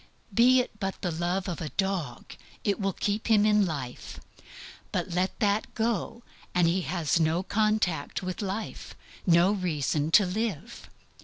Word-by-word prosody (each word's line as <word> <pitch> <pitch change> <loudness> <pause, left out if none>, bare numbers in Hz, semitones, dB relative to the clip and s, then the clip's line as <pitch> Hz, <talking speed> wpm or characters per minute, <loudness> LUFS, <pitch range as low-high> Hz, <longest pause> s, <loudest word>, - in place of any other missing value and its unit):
Be 250 +4 +6
it 215 -4 -9
but 195 -2 -3
the 175 - 0
love 175 +4 -1
of 175 -1 -4
a 155 - -3
dog, 185 -11 -3 0.3
it 200 0 0
will 195 -1 0
keep 205 +4 -2
him 215 -2 +5
in 210 -2 +4
life; 135 -7 -6 0.7
but - - -2
let 180 +2 -1
that 205 0 +1
go, 230 +1 -1 0.3
he 175 +1 +3
has 170 -3 0
no 165 +3 +1
contact 200 -7 0
with 185 +2 -4
life, 205 +2 -5 0.3
no 175 +2 +5
reason 155 -6 -1
to 200 +4 +6
live. 200 -2 -4
190 Hz, 150 wpm, -28 LUFS, 170-210 Hz, 0.7 s, Be